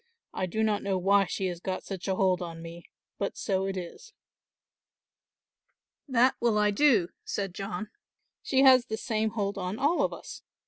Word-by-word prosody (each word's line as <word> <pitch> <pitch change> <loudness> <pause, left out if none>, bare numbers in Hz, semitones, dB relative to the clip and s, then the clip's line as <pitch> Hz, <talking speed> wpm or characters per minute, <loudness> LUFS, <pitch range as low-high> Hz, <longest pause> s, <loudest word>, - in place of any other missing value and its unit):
I 185 - -2
do 220 +5 -1
not 210 -2 +1
know 195 -1 -1
why 195 +2 +4
she 190 - -3
has 175 -2 -3
got 185 +1 -4
such 190 -2 -6
a 190 - +1
hold 185 -1 +2
on 165 -2 -6
me, 170 +1 -10 0.3
but 200 - -2
so 190 -1 -1
it 195 -1 -3
is." 185 - -8 1.9
"That 255 -1 +4
will 235 -3 +2
I 210 0 +3
do," 205 -6 +3
said 195 -3 -3
John, 210 +3 -5 0.5
"she 265 -1 +2
has 255 -2 +7
the 220 - -3
same 220 -2 -1
hold 200 -2 -2
on 185 +3 -3
all 295 +7 +2
of - - +1
us. - - -9
200 Hz, 180 wpm, -28 LUFS, 185-220 Hz, 1.9 s, has